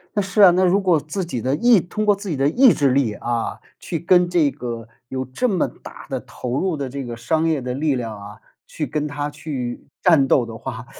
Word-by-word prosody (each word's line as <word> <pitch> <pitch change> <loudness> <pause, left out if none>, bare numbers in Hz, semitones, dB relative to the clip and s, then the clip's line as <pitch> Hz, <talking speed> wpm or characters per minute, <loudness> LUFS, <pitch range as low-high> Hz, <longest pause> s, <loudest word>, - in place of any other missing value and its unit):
那 205 - +2
是 195 +2 +2
啊， 185 - +9
那 185 +2 +2
如 185 +2 +4
果 180 -5 +3
自 175 +6 -4
己 125 -9 -4
的 130 +4 0
意 230 +1 +5
通 210 +5 -3
过 205 - +4
自 200 -1 -7
己 155 - -1
的 135 +1 +2
意 245 - +6
志 140 -4 +2
力， 130 -5 +1
啊， 120 +2 -3 0.2
去 170 - -4
跟 175 +1 +3
这 165 -5 +2
个 115 -3 -6 0.2
有 130 0 -4
这 180 - -1
么 185 -4 +1
大 - - -12
的 - - -3
投 125 +2 -4
入 185 -4 -1
的 140 -2 -3
这 140 +2 -5
个 120 -2 -6
商 160 +7 0
业 155 -3 +1
的 125 0 -4
力 145 0 0
量 115 -3 -4
啊， 105 +1 -11 0.3
去 150 - -4
跟 150 0 -2
它 145 0 -3
去 140 -5 -5 0.2
战 160 -7 +5
斗 125 -2 +3
的 115 -1 -8
话， 120 -1 -7
145 Hz, 255 characters per minute, -21 LUFS, 125-180 Hz, 0.3 s, 啊